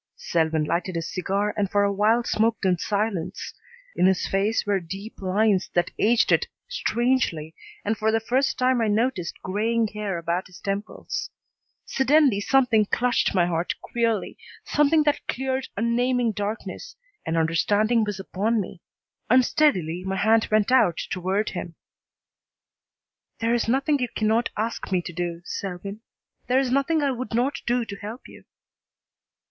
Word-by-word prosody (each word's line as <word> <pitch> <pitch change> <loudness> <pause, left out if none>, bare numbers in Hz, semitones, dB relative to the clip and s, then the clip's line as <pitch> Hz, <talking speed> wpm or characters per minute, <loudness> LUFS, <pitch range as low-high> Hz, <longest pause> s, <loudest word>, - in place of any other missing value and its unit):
Selwyn 160 - 0
lighted 175 +4 -2
his 165 0 -4
cigar 200 +3 -1
and 200 -2 0
for 205 0 +2
a 200 0 +1
while 220 +4 +3
smoked 225 -2 0
in 185 -1 +4
silence. 200 -2 -2 0.4
In 180 - +4
his 190 -1 +2
face 200 +3 0
were 200 -1 +1
deep 195 +6 -8
lines 195 0 +2
that 175 - +1
aged 230 +2 +3
it - - +3 0.2
strangely 240 - 0 0.3
and 220 +2 +1
for 220 0 +1
the 225 - +2
first 255 +5 0
time 255 -1 +2
I 225 - +2
noticed 210 -4 -1
graying 220 +4 0
hair 210 -3 -3
about 170 +2 -2
his 180 - -14
temples. 200 +2 -4 0.6
Suddenly 270 -5 +3
something 235 -3 +3
clutched 245 -2 +1
my 175 -2 +4
heart 170 0 -1
queerly, 230 -3 -2 0.2
something 295 +1 +3
that 295 -1 0
cleared 265 0 -2
unnaming 240 +1 +1
darkness, 215 - -5 0.3
and 165 - -2
understanding 205 +8 +2
was 210 -2 -3
upon 210 +4 -1
me. 185 -3 -6 0.5
Unsteadily 220 - +3
my 190 0 -2
hand 220 +4 +3
went 215 +2 +2
out 220 -10 +4
toward 190 +3 -1
him. 175 -2 -6 1.6
"There 230 +1 0
is 240 -2 +1
nothing 275 +4 +2
you 250 - 0
cannot 220 +2 +1
ask 220 -1 -3
me 180 -2 +1
to 175 - -7
do, 175 0 -4
Selwyn. 195 +2 -5 0.5
There 255 - +2
is 265 -2 0
nothing 285 +4 +2
I 280 - +2
would 245 -3 -4
not 255 +4 0
do 240 0 +1
to 200 - -7
help 215 +5 -8
you." - - -15
215 Hz, 155 wpm, -24 LUFS, 190-240 Hz, 1.6 s, in